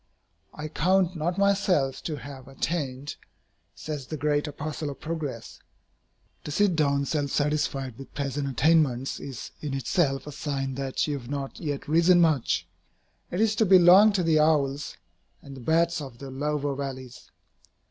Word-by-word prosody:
"I 150 - -5
count 180 +3 +1
not 170 +3 -2
myself 195 -9 +2
to 155 - -2
have 135 0 -10
attained," 140 -1 -3 0.6
says 150 -4 -6
the 155 - -5
great 150 0 0
apostle 150 +1 -4
of 140 - -8
progress. 155 -7 -5 0.8
To - - -7
sit 185 +4 +2
down 140 -2 +1
self 145 -1 -1
satisfied 140 -4 -1
with 135 - -11
present 140 0 -2
attainments 135 -3 +2
is 135 -5 -7
in 145 -3 -3
itself 135 +1 0
a 150 - -7
sign 135 -2 -3
that 135 0 -1
you 145 -2 -2
have 120 -1 -12
not 140 -1 -5
yet 145 -4 -4
risen 170 +3 +5
much. 115 - +2 0.6
It 175 - -3
is 220 -1 +2
to 220 - +4
belong 190 +3 +8
to 190 -3 +1
the 160 -2 +3
owls 150 -2 +1 0.5
and 140 -2 -10
the 130 - -10
bats 165 +4 +1
of 130 -5 -9
the 135 +1 -8
lower 145 +1 -1
valleys. 130 -2 -7
145 Hz, 160 wpm, -26 LUFS, 135-165 Hz, 0.8 s, belong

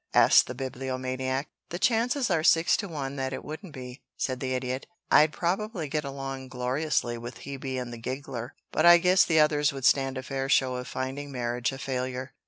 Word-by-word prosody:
asked - - +6
the - - -6
Bibliomaniac. 130 +1 -3 0.2
"The 175 - -4
chances 240 +3 +1
are 160 -2 +2
six 165 +1 +5
to 200 - -3
one 140 -5 -5
that 135 0 -2
it - - -6
wouldn't 160 +4 -7
be," 125 -1 -9 0.2
said 130 -1 -2
the 130 0 -2
Idiot. 130 +1 -3 0.2
"I'd 150 0 +6
probably 185 +1 -2
get 150 +1 -1
along 135 -1 -5
gloriously 125 -1 -1
with 120 +1 -8
Hebe 135 -2 -4
and 120 -1 -5
the 115 - -8
giggler, 130 -1 -5 0.2
but - - +1
I 175 0 +9
guess 180 +2 +5
the 160 -2 +3
others 150 -1 +3
would 135 -2 -5
stand 135 0 +3
a 130 - -4
fair 135 0 -3
show 130 -2 +3
of 125 - -6
finding 135 +2 -4
marriage 120 0 -1
a 135 - -7
failure. 130 0 -4
135 Hz, 195 wpm, -27 LUFS, 130-155 Hz, 0.2 s, I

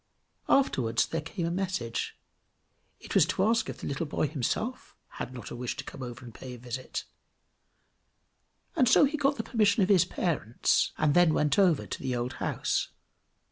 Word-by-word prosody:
Afterwards 120 - +3
there 165 - -3
came 165 +3 -4
a 170 - -1
message; 175 -11 -2 0.8
it - - -8
was 175 -5 +5
to 185 +1 0
ask 225 +2 +2
if - - -6
the - - -5
little 145 +3 -2
boy 150 - 0
himself 160 - -3 0.2
had 125 - -4
not 125 -2 -8
a - - -5
wish 125 0 -3
to 135 - -4
come 135 - -9
over 125 0 -7
and 120 - -10
pay 125 +2 -8
a - - -11
visit; 125 +2 -5 1.7
and 255 -8 +4
so 280 - +7
he 290 +3 -1
got 285 -1 +2
permission 210 -3 +3
of 185 - 0
his 190 -5 +5
parents, 140 - 0
and 155 -2 +2
then 175 -2 +5
went 150 +4 +2
over 180 -6 +4
to - - -5
the 130 -2 -1
old 120 +1 -2
house. - - 0
155 Hz, 180 wpm, -29 LUFS, 125-200 Hz, 1.7 s, so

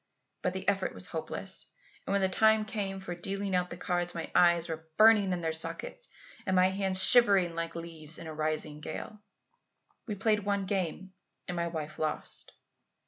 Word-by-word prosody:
But - - -1
the - - -6
effort - - 0
was - - -4
hopeless, - - -2 0.4
and - - -2
when 200 - +2
the - - +4
time 220 +3 +3
came 200 -3 -3
for 190 -2 -6
dealing 195 +2 -3
out 180 0 0
the 170 - -7
cards, 175 -1 -2
my 165 - -5
eyes 170 -1 +4
were 160 -1 -6
burning 215 -3 +6
in 180 -1 -2
their 160 -1 -1
sockets - - -3 0.4
and 190 - +1
my 185 0 +5
hands 190 -1 +2
shivering 200 -8 +6
like 165 0 -4
leaves 165 -2 0
in 170 - -9
a 160 - -6
rising 155 -1 -2
gale. 210 +6 -7 0.9
"We 210 - -3
played 210 +2 +2
one 200 -1 -1
game 190 -1 -3 0.3
and 180 - -4
my 170 0 -1
wife 155 -2 -6
lost. 155 -1 -4
180 Hz, 185 wpm, -30 LUFS, 165-200 Hz, 0.9 s, burning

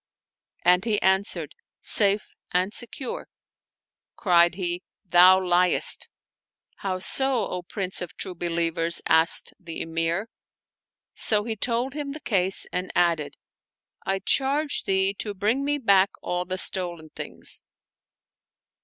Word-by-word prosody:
And 180 +1 +5
he 215 -2 0
answered, 190 -5 0 0.3
"Safe 205 0 +3 0.2
and 185 +3 0
secure." 245 +2 -6 0.9
Cried 175 -3 +3
he, 175 -2 -3 0.2
"Thou 180 +1 +6
liestl" 180 0 +1 0.7
"How 190 -2 -3
so, 255 +4 +1
O 180 - -5
Prince 185 +1 -5
of 180 - -8
True 190 - -4
Believers?" 170 -1 0
asked 160 +1 +4
the 170 -3 -8
Emir. 165 +5 -2 0.9
So 210 -2 +1
he 225 0 -4
told 240 +4 +1
him 290 -1 -5
the 305 - -8
case 190 -7 +2
and 180 +1 -3
added, 170 -4 0 0.3
" - - -38
I 195 0 -1
charge 280 +8 0
thee 190 0 +1
to 205 -2 -4
bring 220 +8 0
me 290 +1 0
back 200 -7 +3
all 180 0 -2
the 185 +1 -4
stolen 175 -4 +1
things." - - -4
185 Hz, 125 wpm, -24 LUFS, 175-210 Hz, 0.9 s, Thou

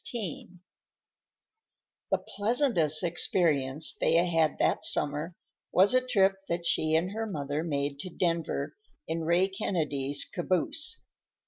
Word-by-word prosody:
XVI 185 -5 -6 1.5
The - - +2
pleasantest 205 - 0
experience 160 -4 +1
Thea 170 +1 +2
had 165 -3 +1
that - - +1
summer 150 +4 0 0.4
was 190 +5 +5
a 255 - +4
trip 200 -6 +2
that 170 0 -2
she 155 -1 +2
and 175 +4 +1
her 225 +1 -3
mother 145 -4 -3
made 140 -3 -2
to 185 - -6
Denver 165 -4 -2 0.3
in 165 +1 -2
Ray 175 +3 +3
Kennedy's 150 -8 -1
caboose. 185 - 0
170 Hz, 120 wpm, -28 LUFS, 150-190 Hz, 1.5 s, was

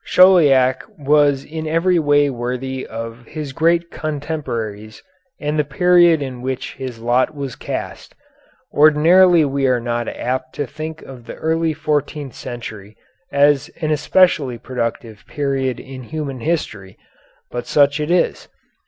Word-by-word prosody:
Chauliac 145 -9 +5 0.2
was 145 -1 +3
in 160 +1 -6
every 170 +3 +2
way 145 -1 +3
worthy 130 +1 -4
of 115 +1 -7
his 150 -4 -6
great 170 +3 +1
contemporaries 120 -9 -5 0.4
and 150 +1 -2
the - - +3
period 170 +1 +4
in 130 -2 -7
which 130 0 -4
his 130 -3 -7
lot 120 +6 +1
was 140 -3 -5
cast. - - -6 0.6
Ordinarily 160 +3 +5
we 135 -1 0
are 125 -1 +2
not 120 0 -3
apt 130 +1 -4
to 145 - -2
think 155 +3 -7
of 125 -3 -12
the - - -7
early 160 0 0
fourteenth 150 -2 -2
century 110 -4 -8 0.3
as 145 0 +3
an 155 -2 -1
especially 150 -4 +2
productive 115 -3 -5
period 135 -3 -2
in 130 -1 -9
human 140 0 -5
history, 110 - -3 0.5
but 120 0 -5
such 145 0 +3
it 150 +1 -2
is. 175 0 +1
140 Hz, 135 wpm, -19 LUFS, 125-155 Hz, 0.6 s, Chauliac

